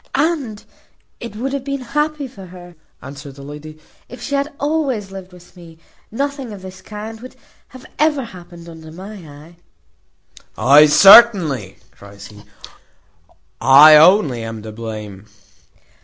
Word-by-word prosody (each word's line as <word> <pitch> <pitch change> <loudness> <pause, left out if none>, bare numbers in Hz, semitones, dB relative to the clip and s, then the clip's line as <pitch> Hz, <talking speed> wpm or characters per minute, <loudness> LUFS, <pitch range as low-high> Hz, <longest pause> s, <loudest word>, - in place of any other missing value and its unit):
"And 280 -9 -2 0.5
it 235 -3 -9
would 265 +5 -5
have 280 -2 -4
been 275 -1 -5
happy 295 +3 -3
for 200 -7 -14
her," 175 0 -14 0.3
answered 140 0 -11
the 140 - -13
lady, 150 +2 -11 0.3
"if 250 - -12
she 245 +4 -7
had 280 +2 -2
always 280 -9 -3
lived 190 -1 -11
with 180 0 -19
me. 170 -2 -16 0.3
Nothing 275 0 -5
of 200 -2 -11
this 190 0 -12
kind 215 +1 -10
would 255 - -12 0.3
have 255 -1 -15
happened 190 - -4
under 160 -1 -13
my 190 +6 -11
eye." 155 -1 -15 1.0
"Ay, 140 +7 +5
certainly," 175 - +5
cries 100 0 -15
he, 105 -1 -16 1.2
"I 140 +5 +7
only 155 - +4
am 115 -1 -8
to 110 - -9
blame." 105 -3 -9
185 Hz, 140 wpm, -17 LUFS, -, 1.2 s, I